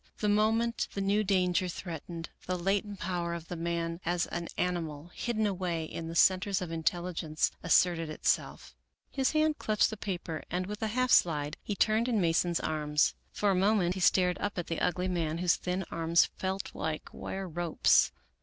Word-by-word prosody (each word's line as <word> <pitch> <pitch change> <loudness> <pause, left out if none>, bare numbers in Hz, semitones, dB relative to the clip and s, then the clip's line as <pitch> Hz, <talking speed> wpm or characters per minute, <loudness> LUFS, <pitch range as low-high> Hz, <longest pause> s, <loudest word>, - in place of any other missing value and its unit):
The 210 - -1
moment 225 +3 +2
the - - -2
new 200 +2 +2
danger 185 -2 +2
threatened, 170 -1 -6 0.2
the 185 0 0
latent 195 +2 -1
power 170 -1 -2
of 170 -1 -9
the 175 - -4
man 165 0 -2
as 175 0 0
an 170 -1 -4
animal, 170 -3 -2
hidden 220 -2 -1
away 180 -5 -1
in 165 +1 -6
the 165 - -6
centers 190 +2 +4
of 180 -3 -5
intelligence, 165 -1 -1
asserted 165 -1 +3
itself. 155 - -1 0.4
His 270 +1 0
hand 310 0 +2
clutched 215 +1 +2
the 220 - -5
paper 175 -6 -4
and, 180 +2 -1
with 210 +3 -6
a 220 - 0
half 255 +3 0
slide, 150 -3 +3
he 205 - -4
turned 220 +4 +2
in 235 -4 +1
Mason's 170 0 +2
arms. 150 -1 +1 0.2
For 205 -1 +1
a - - +3
moment 190 -2 +3
he 190 - -5
stared 180 0 +3
up 205 -1 -3
at 175 - -2
the 165 - -3
ugly 180 +1 0
man 165 -3 -1
whose 180 0 +3
thin 180 +1 -3
arms 165 0 +3
felt 190 +1 -3
like 155 0 -4
wire 190 0 -5
ropes. 170 -1 +3
180 Hz, 180 wpm, -30 LUFS, 165-200 Hz, 0.4 s, centers